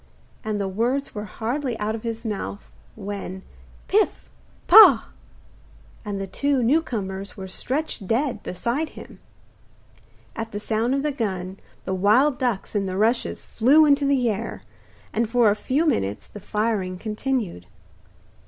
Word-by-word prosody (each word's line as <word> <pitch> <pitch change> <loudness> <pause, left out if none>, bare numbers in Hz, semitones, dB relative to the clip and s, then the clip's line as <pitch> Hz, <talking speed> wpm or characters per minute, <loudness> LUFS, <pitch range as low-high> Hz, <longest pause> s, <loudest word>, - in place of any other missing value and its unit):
And 215 -1 -2
the 200 - -1
words 240 +8 -1
were 210 -1 -5
hardly 240 +4 -3
out 210 +1 -1
of 225 - -5
his 230 0 -5
mouth, 205 -1 -4 0.3
when 195 -2 -6 0.4
'Pif! - - +1 0.4
pah!' - - +8 0.9
and 205 -1 -4
the 195 - -3
two 275 +6 0
new 290 +8 +4
comers 195 -8 -5
were 190 -1 -6
stretched 250 +2 -4
dead 235 -1 0
beside 240 - -2
him. - - -11 1.2
At 225 -1 -5
the 205 - -3
sound 225 +4 0
of 275 - -1
the 300 - 0
gun 190 -7 -3 0.2
the 190 - -3
wild 230 +9 +3
ducks 240 -6 -1
in 200 -2 0
the 185 0 -3
rushes 230 +4 0
flew 280 +7 +5
into 285 -1 +3
the 265 -3 +2
air, 210 -3 -3 0.5
and 225 0 0
for 235 -3 +4
a - - +1
few 275 +8 0
minutes 105 - -1
the 205 - -10
firing 205 -3 -1
continued. 215 - -3
220 Hz, 150 wpm, -24 LUFS, 200-255 Hz, 1.2 s, pah